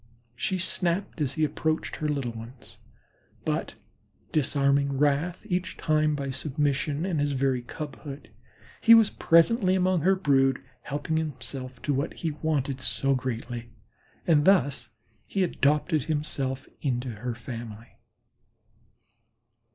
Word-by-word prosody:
She 185 +9 -1
snarled 180 -1 0
as 140 -2 0
he 155 - +1
approached 155 +1 -1
her 155 - -2
own 150 - +1
little 130 -4 -2
ones, 115 +3 -9 0.7
but - - -1 0.6
disarming 140 -1 +2
wrath 150 +7 +1
each 185 -1 -2
time 155 -1 +2
by 140 -2 -3
submission 145 +2 -1
and 175 -5 0
his 145 0 +1
very 130 -2 +1
cubhood, 145 +1 -8 0.5
he 230 - +9
was 225 -2 +5
presently 185 +3 +4
among 185 -2 +2
her 190 +5 +4
brood, 135 -7 +3 0.2
helping 150 +2 -2
himself 130 -4 -4
to 145 - +1
what 140 +3 -1
he 165 - -2
wanted 145 -3 -1
so 130 +4 +1
greatly, 120 -2 -4 0.6
and 155 -3 +4
thus 145 - +3 0.4
he 195 - 0
adopted 150 -2 +1
himself 140 -4 -2
into 125 -2 -1
her 120 +2 -4
family. 115 -1 -8
145 Hz, 130 wpm, -27 LUFS, 130-160 Hz, 0.7 s, he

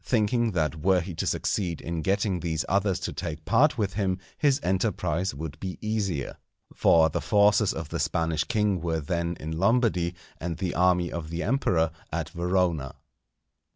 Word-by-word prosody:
thinking 115 -1 +1
that 80 -2 0
were 90 +4 +3
he 90 +1 -5
to - - -3
succeed 85 -5 -1
in 85 -1 -4
getting 95 +1 0
these 80 -2 -2
others 100 0 +1
to - - -4
take 80 -2 -5
part 130 +6 +4
with 100 -4 -1
him, 95 -2 0 0.2
his 145 -2 +2
enterprise 90 -2 0
would 80 +1 -6
be 95 -1 -5
easier. 100 - -2 0.4
For 80 -1 +5
the - - -2
forces 105 0 +4
of - - -5
the - - -3
Spanish 80 -1 0
king 105 -1 +1
were 80 -1 -1
then 85 +3 -2
in 80 - -5
Lombardy, 100 -5 +2 0.2
and 85 -1 -4
the 95 -2 -2
army 90 -1 +2
of 80 -2 -5
the 85 +1 -3
Emperor 90 - +1 0.2
at - - -2
Verona. 85 -5 0
90 Hz, 170 wpm, -27 LUFS, 80-100 Hz, 0.4 s, For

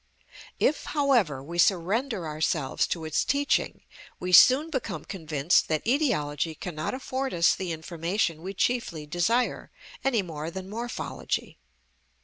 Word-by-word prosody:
If, 305 - +1
however, 230 - +2
we 170 +4 -6
surrender 195 +4 +1
ourselves 155 -2 0
to 165 -2 -3
its 155 - +1
teaching, 285 +1 0 0.4
we 180 - -3
soon 270 - +7
become 205 - -3
convinced 160 -4 +1
that 155 -1 -1
etiology 165 - 0
cannot 155 +6 -4
afford 260 -2 -3
us 170 +1 +4
the 185 -2 -4
information 165 +1 -2
we 190 +3 -6
chiefly 185 -9 -1
desire, 175 +11 0 0.3
any 240 -7 +2
more 160 -2 -5
than 190 +2 -7
morphology. 235 +2 -4
180 Hz, 130 wpm, -27 LUFS, 160-240 Hz, 0.4 s, soon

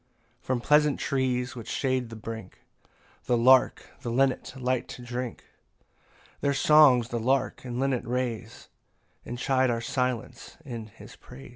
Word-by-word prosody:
8 - - -33
From 130 -2 0
pleasant 150 +2 +3
trees 130 -2 -1
which 115 -3 -8
shade 130 -3 -1
the 115 - -8
brink 110 -2 -8 0.6
The 120 - +2
lark 130 +2 +4 0.2
and 120 0 -2
linnet 135 0 0
light 130 0 -1
to 125 - -9
drink; 120 0 -5 1.0
Their 140 -1 0
songs 135 -6 +5
the 120 - -2
lark 130 +4 0
and 125 0 -4
linnet 135 -3 -1
raise; 120 -2 -4 0.6
And 120 - -6
chide 130 0 +1
our 115 -1 0
silence 125 0 -3
in 115 -5 -6
his 105 - -14
praise. 65 - -13
125 Hz, 150 wpm, -27 LUFS, 120-130 Hz, 1.0 s, songs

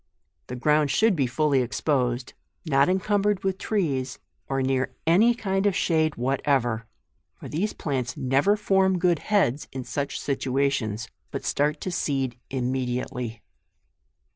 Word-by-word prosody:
The 125 - -5
ground 150 +3 +2
should 215 +8 +3
be 135 -5 +1
fully 140 +2 +2
exposed, 125 -1 -1 0.3
not 140 0 +3
incumbered 200 +1 +1
with 190 0 -1
trees, 140 - -1 0.3
or 135 -1 0
near 130 0 0
any 210 +9 +5
kind 195 -3 0
of 200 - +1
shade 160 -2 +1
whatever; 120 -3 0 0.5
for - - -10
these 190 +8 -1
plants 130 -5 -3
never 140 +11 +2
form 190 -2 +2
good 175 -2 +2
heads 190 - +1
in 130 -1 -5
such 140 +2 -3
situa 135 0 0
tions, 110 -4 -3 0.2
but - - -5
start 150 +1 +1
to 185 - -3
seed 135 -7 -1
immediately. 125 -2 -3
140 Hz, 140 wpm, -25 LUFS, 130-185 Hz, 0.5 s, any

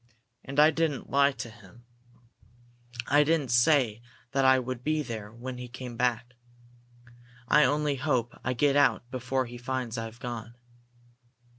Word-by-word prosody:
"And 140 +1 -3
I 155 +1 +7
didn't 155 -3 -2
lie 140 0 +4
to 115 - -7
him. 110 +1 -17 1.2
I 145 +3 +4
didn't 150 -4 +1
say 120 -3 +3 0.3
that 135 0 +1
I 130 0 +6
would 130 -1 -4
be 155 +1 0
there 110 -5 -6
when 125 +2 -7
he 125 - -6
came 125 0 -8
back. 125 0 -1 1.1
I 150 +3 +5
only 145 -1 +1
hope 125 -4 0
I 130 - 0
get 140 +3 +2
out 135 -4 +2
before 130 0 -1
he 120 0 -9
finds 125 -2 -3
I've 115 +1 -7
gone!" 120 -1 -6
125 Hz, 150 wpm, -28 LUFS, 120-140 Hz, 1.2 s, I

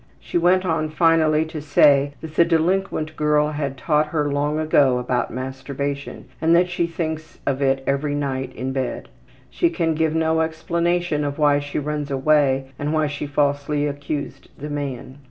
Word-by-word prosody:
She - - -2
went 185 +2 +3
on 160 -3 0
finally 160 -1 +3
to 160 -1 -7
say 145 -1 +4
that 160 -1 -8
the 170 - +5
delinquent 165 -1 0
girl 150 0 +2
had 140 -3 -3
taught 150 +2 +1
her 150 -1 -1
long 145 +2 0
ago 145 -5 +3
about 125 0 -1
masturbation 135 +2 -5 0.2
and 165 +1 +4
that 180 +1 +3
she 175 -1 0
thinks 160 -1 -5
of 140 0 -1
it 135 -1 +1
every 145 +1 0
night 135 -2 -2
in 130 +1 -3
bed. 130 -2 -3 0.4
She 345 - +2
can 165 - 0
give 160 0 0
no 160 0 +2
explanation 170 0 -1
of 145 -1 -3
why 145 -2 +3
she 145 0 -5
runs 150 0 -3
away 135 -1 +2
and 145 +1 -2
why 155 -1 +2
she 145 0 -4
falsely 145 0 0
accused 145 -1 -5
the 150 +2 -6
man. 140 -2 -5
150 Hz, 170 wpm, -22 LUFS, 140-160 Hz, 0.4 s, the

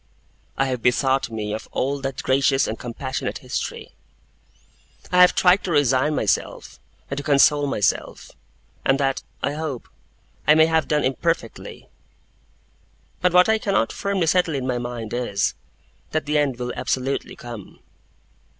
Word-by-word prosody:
I 135 - +2
have 130 -3 -2
bethought 130 +2 +2
me 105 -2 -4
of 110 - -6
all 140 +1 -1
that 135 0 -4
gracious 135 0 +3
and 110 - -4
compassionate 130 +2 -4
history. - - -5 1.2
I 180 0 +5
have 180 - +6
tried 180 +2 +4
to 180 - -2
resign 145 0 +2
myself, 105 - -2 0.3
and 140 - -2
to - - -6
console 145 0 +4
myself; 105 -7 -1 0.5
and 135 - +3
that, 135 -1 0 0.2
I 140 - 0
hope, 150 -5 -5 0.6
I 150 - +7
may 160 0 +6
have 160 -1 +1
done 150 -1 +1
imperfectly; 135 -2 -2 1.3
but 180 - +3
what 180 +1 +6
I 220 0 +3
cannot 200 - 0
firmly 200 -3 -1
settle 165 -1 +2
in 130 -2 -2
my 125 -2 -1
mind 120 -2 -5
is, 110 -5 0 0.6
that 155 -1 0
the 150 0 +1
end 140 -4 0
will 125 0 -4
absolutely 135 +1 -2
come. 120 -5 -10
135 Hz, 150 wpm, -22 LUFS, 125-155 Hz, 1.3 s, I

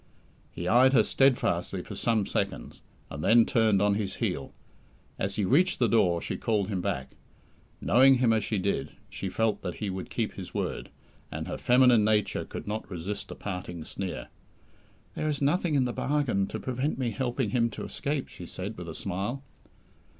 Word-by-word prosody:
He 85 - -5
eyed 125 +6 +5
her 115 -5 +6
steadfastly 100 -9 +1
for - - -8
some 115 -4 +1
seconds, - - -3 0.3
and 75 +2 -5
then 115 0 +6
turned 110 -4 +3
on 105 0 +3
his 100 -2 -2
heel. - - -2 0.7
As 100 +1 -2
he 105 - 0
reached 170 - +3
the 120 - +3
door 90 -6 +3
she - - -3
called 105 -4 0
him 95 -4 -1
back. 65 -6 -3 0.7
Knowing 135 +2 +6
him 125 -3 +3
as 110 -2 +1
she 105 - -1
did, 100 +1 -1 0.2
she 95 - -4
felt 110 +2 0
that 90 - -4
he 105 -3 -3
would 95 0 -6
keep - - -2
his - - -9
word, - - -3 0.4
and - - -5
her - - -3
feminine 125 -3 +5
nature 105 -1 +1
could - - -7
not 105 0 -4
resist 95 +2 -5
a - - -7
parting 90 -4 -5
sneer. 95 +2 -5 0.8
"There 155 - -2
is 150 -2 -1
nothing 150 +3 +1
in 130 -2 +3
the 120 - -2
bargain 135 -10 0
to - - -5
prevent 130 +4 -2
me 125 -3 -1
helping 125 -3 -1
him 115 0 +2
to - - -6
escape!" 140 -1 -3
she 90 - -10
said 95 +2 -6
with 85 -1 -6
a 80 - -7
smile. 100 +8 -3
110 Hz, 185 wpm, -28 LUFS, 95-125 Hz, 0.8 s, her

